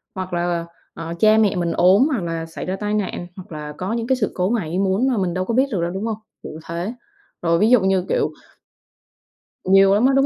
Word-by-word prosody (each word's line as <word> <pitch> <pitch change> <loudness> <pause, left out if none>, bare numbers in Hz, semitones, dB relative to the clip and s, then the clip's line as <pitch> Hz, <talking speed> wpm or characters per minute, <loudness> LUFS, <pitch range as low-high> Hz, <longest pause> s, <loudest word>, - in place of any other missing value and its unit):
hoặc 185 -1 -5
là, 175 -1 -1 0.3
ờ, 165 - -7
ờ 165 - -4
cha 215 0 +5
mẹ 210 -3 +3
mình 175 -2 -1
ốm 190 - +5
hoặc 235 -10 -1
là 165 -1 -3
xảy 165 - -7
ra 185 - -2
tai 210 +1 -3
nạn 190 -4 -2
hoặc 185 -2 -11
là 150 -1 -6
có 190 +5 -3
những 230 0 -2
cái 260 - +3
sự 215 -5 -1
cố 180 +1 0
ngoài 215 -9 -1
ý 180 - -1
muốn 195 +6 +1
mà 245 - 0
mình 185 -3 0
đâu 185 +1 -2
có 230 - -2
biết 260 +3 +4
được 190 -6 -1
đâu, 170 - -1
đúng 190 +4 -4
hông? 225 -2 -2 0.3
Kiểu - - -7
thế. 175 +7 -4 0.5
Rồi 170 0 +2
ví 215 - +4
dụ 250 -1 +6
như 190 -1 +1
kiểu - - +1 1.3
Nhiều 195 +1 +5
lắm 215 +5 +3
á, 270 - +4
đúng 275 - +4
190 Hz, 260 wpm, -21 LUFS, 175-215 Hz, 1.3 s, dụ